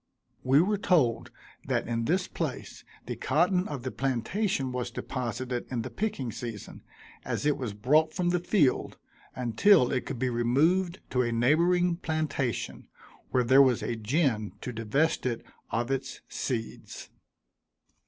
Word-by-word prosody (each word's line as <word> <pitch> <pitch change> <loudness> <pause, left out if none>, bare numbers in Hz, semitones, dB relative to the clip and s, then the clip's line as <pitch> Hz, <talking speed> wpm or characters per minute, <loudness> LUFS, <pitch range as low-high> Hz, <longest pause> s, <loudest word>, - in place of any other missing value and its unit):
We 135 +3 +5
were 205 +1 0
told 145 - +2 0.4
that - - 0
in 115 -1 -1
this 180 +5 +1
place - - -5 0.2
the - - -4
cotton 180 +6 +1
of 140 -5 -5
the 130 - -3
plantation 135 - -1
was 125 -1 -3
deposited 125 0 -4
in 120 -3 -2
the - - -6
picking 195 - -2
season, 115 -2 -7 0.4
as - - -3
it 150 -1 +3
was 125 -7 -5
brought 150 +9 +3
from 180 -1 0
the 175 0 +2
field, 170 -6 +1 0.4
until 125 - +4
it 130 -2 -1
could 135 - -4
be 125 +1 0
removed 160 +11 +2
to 125 - +2
a 120 -1 0
neighboring 170 +9 +3
plantation, 155 -7 -2 0.4
where 125 - +2
there 130 +3 +6
was 130 -4 +3
a 120 - -2
gin 115 -2 0
to 125 - -5
divest 130 +7 0
it 120 -2 -3 0.2
of 120 +3 -1
its 135 0 -3
seeds. 115 -4 -5
130 Hz, 150 wpm, -28 LUFS, 120-165 Hz, 0.4 s, there